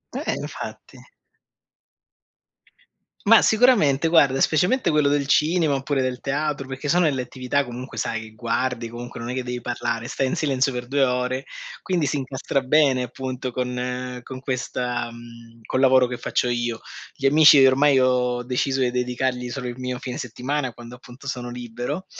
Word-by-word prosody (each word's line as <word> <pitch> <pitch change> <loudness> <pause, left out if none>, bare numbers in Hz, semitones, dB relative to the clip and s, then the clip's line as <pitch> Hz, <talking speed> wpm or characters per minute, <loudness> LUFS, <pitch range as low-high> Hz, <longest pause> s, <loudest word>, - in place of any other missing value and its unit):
Eh, - - -2
infatti. - - -8 2.3
Mah, 225 +2 +7
sicuramente, 205 - +4
guarda, 140 -5 +4
specialmente 180 - +2
quello 150 -2 +3
del 145 -1 +1
cinema 155 0 +2
oppure 135 0 -1
del 130 -1 -2
teatro, 145 0 -2
perché 135 +2 -5
sono 175 +3 +4
delle 135 -4 +1
attività 130 +2 -1
comunque 125 +1 -7
sai, 115 -1 -2
che 110 - -10
guardi, 115 +1 -2
comunque 120 +1 -8
non 115 - -5
è 125 - -3
che 130 - -2
devi 125 0 -5
parlare, 120 -1 -3
stai 135 - -1
in 130 - -1
silenzio 135 -2 +1
per 125 0 -5
2 140 +1 +2
ore, 125 +1 -1 0.4
quindi 175 -6 0
si 145 - -1
incastra 135 0 -2
bene 130 -1 +3
appunto 130 +1 -5
con 125 0 -3
con 130 -1 -8
questa 125 -2 -3
mhmm, 115 0 -14
col 130 - -1
lavoro 130 -1 +5
che 125 - -5
faccio 125 - -1
io. 120 -1 -1 0.4
Gli 135 - 0
amici, 150 -1 +7
ormai 135 +1 +5
ho 125 -1 +1
deciso 130 +2 -1
di 125 - +2
dedicargli 125 0 -2
solo 125 -1 -4
il 120 0 -6
mio 125 -1 -4
fine 125 -1 -5
settimana, 125 +2 -3
quando 120 +1 -11
appunto 125 +2 -14
sono 125 -3 -4
libero, 120 +8 -5
130 Hz, 170 wpm, -23 LUFS, 125-140 Hz, 2.3 s, Mah